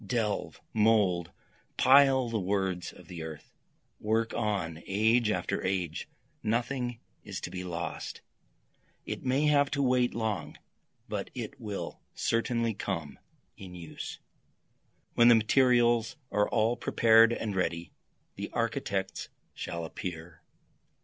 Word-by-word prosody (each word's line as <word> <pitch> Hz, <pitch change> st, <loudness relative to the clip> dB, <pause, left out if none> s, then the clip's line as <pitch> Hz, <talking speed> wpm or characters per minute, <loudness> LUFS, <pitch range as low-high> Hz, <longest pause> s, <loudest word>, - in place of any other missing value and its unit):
Delve! 105 Hz, 0 st, -2 dB
mould! 105 Hz, -6 st, +3 dB, 0.5 s
pile 135 Hz, -1 st, +6 dB
the 115 Hz, -1 st, -1 dB
words 95 Hz, -2 st, -1 dB
of -, -, -16 dB
the 85 Hz, -2 st, -7 dB
earth! 80 Hz, -2 st, -8 dB, 0.5 s
Work 110 Hz, +1 st, 0 dB
on, 95 Hz, -8 st, -2 dB
age 110 Hz, +3 st, +3 dB
after 105 Hz, -, -1 dB
age, 90 Hz, -4 st, -2 dB, 0.3 s
nothing 120 Hz, +1 st, -1 dB, 0.2 s
is -, -, -5 dB
to -, -, -5 dB
be 90 Hz, 0 st, -5 dB
lost, 85 Hz, -2 st, -5 dB, 0.8 s
It -, -, -5 dB
may 130 Hz, +3 st, +2 dB
have 145 Hz, -2 st, +4 dB
to 140 Hz, -1 st, 0 dB
wait 125 Hz, -1 st, +2 dB
long, 105 Hz, -10 st, -2 dB, 0.5 s
but -, -, -4 dB
it -, -, -6 dB
will 105 Hz, -3 st, -5 dB
certainly 115 Hz, 0 st, 0 dB
come 85 Hz, -7 st, -4 dB, 0.4 s
in 90 Hz, -2 st, -10 dB
use, 85 Hz, -3 st, -7 dB, 0.9 s
When 120 Hz, -, +6 dB
the 120 Hz, -, +9 dB
materials 120 Hz, 0 st, +3 dB, 0.2 s
are 105 Hz, 0 st, +2 dB
all 115 Hz, +1 st, +2 dB
prepared 115 Hz, 0 st, +5 dB
and 110 Hz, -3 st, -2 dB
ready, 85 Hz, -2 st, -1 dB, 0.5 s
the -, -, -4 dB
architects 95 Hz, -1 st, -2 dB, 0.2 s
shall 85 Hz, -1 st, -4 dB
appear. 80 Hz, 0 st, -7 dB
110 Hz, 125 wpm, -30 LUFS, 90-120 Hz, 0.9 s, the